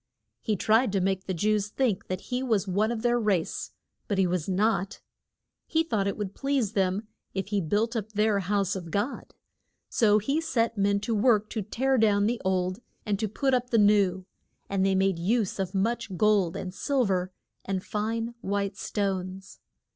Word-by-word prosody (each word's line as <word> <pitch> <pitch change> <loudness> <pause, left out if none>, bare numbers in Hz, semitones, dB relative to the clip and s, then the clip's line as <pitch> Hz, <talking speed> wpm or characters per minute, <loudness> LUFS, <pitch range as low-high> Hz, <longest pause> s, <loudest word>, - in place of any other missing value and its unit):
He 215 - 0
tried 220 +4 +3
to 195 - +2
make 190 0 0
the 190 - -1
Jews 210 +3 +1
think 220 -2 -1
that 185 0 -3
he 250 0 -3
was 220 -6 0
one 205 +4 +1
of 230 -1 -4
their 240 0 +3
race, 200 -7 0 0.4
but 200 - -1
he 190 - +4
was 180 -1 -1
not. 195 0 0 0.7
He 320 0 +2
thought 215 -11 -1
it 200 - -2
would 200 -3 -4
please 275 -7 0
them 195 +2 0 0.3
if 195 +1 -3
he 205 -2 +1
built 210 +8 0
up 215 -1 -3
their 210 -1 +2
House 195 0 0
of 175 -3 -6
God, 205 - -3 0.5
so 210 -3 +4
he 275 +9 0
set 235 -8 0
men 200 0 +2
to 230 - -1
work 215 -1 +3
to 220 - -2
tear 260 +6 0
down 205 -2 +3
the 235 +2 0
old 185 +1 0 0.3
and 205 -3 -1
to 220 - 0
put 265 +6 0
up 250 -1 +1
the 230 - +2
new, 200 -3 +3 0.4
and 195 -1 0
they 195 0 +2
made 190 -2 +2
use 205 +3 0
of 190 0 -2
much 220 -1 -1
gold 205 -5 +3
and 180 -1 -5
sil 265 +5 +1
ver 185 -2 0 0.3
and 190 -1 -2
fine 225 +2 -2
white 200 -1 -1
stones. 190 -2 -3
205 Hz, 190 wpm, -27 LUFS, 190-225 Hz, 0.7 s, he